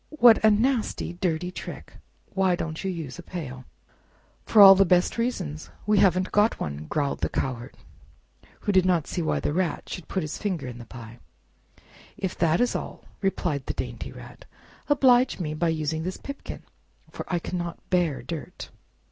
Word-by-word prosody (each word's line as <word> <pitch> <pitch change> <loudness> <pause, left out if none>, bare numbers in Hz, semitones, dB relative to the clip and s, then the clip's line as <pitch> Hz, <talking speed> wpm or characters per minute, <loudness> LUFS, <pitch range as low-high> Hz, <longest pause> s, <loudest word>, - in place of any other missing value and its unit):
"What 235 -5 +7
a 220 - +7
nasty, 225 -4 +1
dirty 175 -1 -2
trick! - - -8 0.4
Why 190 -2 +2
don't 160 0 -5
you 190 - -1
use 165 -5 -6
a - - -5
pail?" 135 -8 -7 0.8
"For 200 -3 +10
the 195 - +5
best 180 -1 +3
of - - -7
all 230 - +3
reasons—we 190 0 -2
haven't 185 -1 +3
got 210 +2 +3
one!" 75 +1 -5
growled 145 -2 -1
the - - -1
Cowherd, 125 0 -4 0.8
who 205 - 0
did 190 -2 +5
not 175 -4 +2
see 180 - -3
why 160 - 0
the - - -1
Rat 175 -2 -1
should 180 - -7
put 190 - -2
his 155 - -5
finger 185 -9 -2
in 125 -1 -7
the 120 - -9
pie. 120 -1 -11 1.0
"If 190 -3 -3
that 165 0 +3
is 245 - +1
all," - - -6 0.2
replied 175 -8 -1
the - - -3
dainty - - -5
Rat, - - -12 0.4
"oblige 260 -5 +4
me 155 -4 -2
by 165 +2 0
using 160 0 -1
this 185 +3 -4
pipkin, 280 0 -8 0.5
for - - -6
I 175 - +2
cannot 175 0 -4
bear 165 -9 +1
dirt!" 155 +3 -7
175 Hz, 175 wpm, -26 LUFS, 155-195 Hz, 1.0 s, For